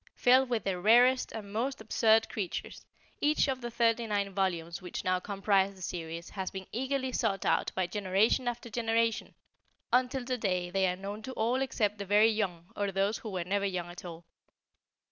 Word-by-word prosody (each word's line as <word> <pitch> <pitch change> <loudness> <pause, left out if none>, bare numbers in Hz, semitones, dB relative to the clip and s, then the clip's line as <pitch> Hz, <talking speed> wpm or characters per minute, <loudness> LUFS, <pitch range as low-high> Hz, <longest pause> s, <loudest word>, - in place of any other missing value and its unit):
Filled 255 +1 +4
with 230 -5 0
the 190 -2 -1
rarest 245 +6 +5
and 205 -2 -8
most 260 +5 -1
absurd 220 0 +3
creatures, 195 -5 -5 0.3
each 295 0 +2
of 260 -1 -2
the 240 - -4
39 225 -4 0
volumes 175 -3 -1
which 180 - -5
now 185 0 +1
comprise 195 0 +1
the 190 - -15
series, 170 -1 -5
has 190 -2 -4
been 190 0 -7
eagerly 260 +2 -1
sought 200 -6 -1
out - - +2
by 185 - +1
generation 200 +6 +1
after 240 0 -3
generation 230 0 0 0.6
until 255 0 +2
today 190 -8 -1
they 190 0 +2
are 180 - 0
known 200 +3 -6
to 260 +4 -7
all 240 +4 0
except 210 -6 0
the 200 - -4
very 210 +3 +5
young 185 -6 -2
or 200 -1 -1
those 195 +3 0
who 220 - -7
were 185 -3 -3
never 200 +3 -1
young 175 -2 -4
at 175 - -10
all. 170 -1 -9
205 Hz, 185 wpm, -30 LUFS, 190-235 Hz, 0.6 s, rarest